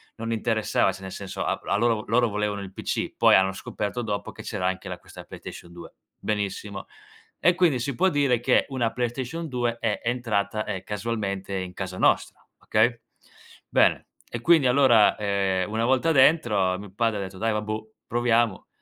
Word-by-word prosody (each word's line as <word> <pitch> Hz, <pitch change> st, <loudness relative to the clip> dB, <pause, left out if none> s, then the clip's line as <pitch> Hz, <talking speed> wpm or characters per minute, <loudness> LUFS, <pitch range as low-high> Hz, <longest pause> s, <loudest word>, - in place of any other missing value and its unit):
non 115 Hz, 0 st, -3 dB
interessava, 110 Hz, -3 st, +1 dB
cioè 95 Hz, +1 st, -11 dB
nel 95 Hz, -, -7 dB
senso 100 Hz, -2 st, -5 dB
a -, -, 0 dB
a -, -, 0 dB
loro 115 Hz, 0 st, +3 dB
vo 105 Hz, -, -6 dB
loro 120 Hz, +2 st, +3 dB
volevano 105 Hz, -1 st, -2 dB
il 95 Hz, -1 st, -9 dB
PC, -, -, -3 dB
poi -, -, +6 dB
hanno 95 Hz, 0 st, +3 dB
scoperto 105 Hz, +4 st, -4 dB
dopo 105 Hz, -3 st, -3 dB
che -, -, -10 dB
c'era 90 Hz, -, -3 dB
anche 95 Hz, 0 st, -3 dB
la -, -, -5 dB
questa -, -, -12 dB
PlayStation 85 Hz, -, -10 dB
2. 85 Hz, 0 st, -11 dB, 0.3 s
Benissimo, 100 Hz, -1 st, -3 dB, 0.5 s
e 175 Hz, 0 st, +4 dB
quindi 165 Hz, -9 st, +3 dB
si 125 Hz, +1 st, -3 dB
può 190 Hz, +2 st, +3 dB
dire 140 Hz, -6 st, +2 dB
che -, -, +3 dB
una 120 Hz, -4 st, -1 dB
PlayStation 130 Hz, +7 st, -3 dB
2 120 Hz, -3 st, -1 dB
è 110 Hz, -3 st, -1 dB
entrata, 110 Hz, -3 st, -1 dB
ehm, 95 Hz, -2 st, -4 dB
casualmente 100 Hz, -2 st, -3 dB
in 90 Hz, -1 st, -5 dB
casa 95 Hz, -1 st, -5 dB
nostra, -, -, +1 dB
okay? 115 Hz, +2 st, +2 dB, 0.7 s
Bene -, -, +3 dB, 0.2 s
e 120 Hz, -, -5 dB
quindi 160 Hz, -3 st, +5 dB
allora, 125 Hz, -5 st, +5 dB
ehm, 100 Hz, -1 st, 0 dB
una 115 Hz, +1 st, 0 dB
volta 130 Hz, +6 st, +2 dB
dentro 120 Hz, -, +4 dB
mio 100 Hz, -1 st, -10 dB
padre 115 Hz, -1 st, 0 dB
ha -, -, -3 dB
detto: 95 Hz, 0 st, -8 dB
"Dai 115 Hz, 0 st, +1 dB
vabbuò, 110 Hz, +1 st, -3 dB, 0.2 s
proviamo, 120 Hz, -3 st, +1 dB
110 Hz, 180 wpm, -25 LUFS, 100-120 Hz, 0.7 s, poi